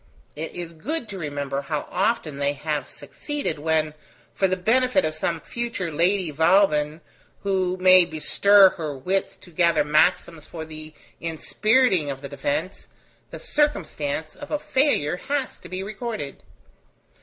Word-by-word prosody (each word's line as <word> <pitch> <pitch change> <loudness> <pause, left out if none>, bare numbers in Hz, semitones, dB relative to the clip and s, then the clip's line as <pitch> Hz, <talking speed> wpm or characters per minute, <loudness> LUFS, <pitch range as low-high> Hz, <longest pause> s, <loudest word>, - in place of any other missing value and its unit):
It 160 +2 -5
is 175 -1 -6
good 240 - -4
to 195 - -6
remember 145 -3 -3
how 145 +1 -4
often 180 -7 0
they 140 0 +1
have 150 -1 -3
succeeded, 290 - -4
when, 155 0 0 0.4
for 195 - +2
the 185 0 -1
benefit 255 +8 +2
of 155 - -1
some 165 +1 -1
future 230 -5 -4
Lady 175 +2 +1
Vauban, 160 -1 +3 0.4
who 185 -2 0
may 185 -1 +7
bestir 190 +5 +5
her 150 -4 -4
wits 190 +9 -1
to 175 - -17
gather 170 -2 +3
maxims 155 +1 +1
for 160 -2 -7
the 155 -1 -10 0.2
inspiriting 190 - +1
of 135 0 -6
the 140 - -6
Defence, 145 +5 -3 0.4
the - - -8
circumstance 165 - -1
of 290 - -10
a 300 - 0
failure 260 - +1
has 280 +5 -3
to - - -12
be 185 +1 -4
recorded. 210 - -5
170 Hz, 145 wpm, -24 LUFS, 150-200 Hz, 0.4 s, may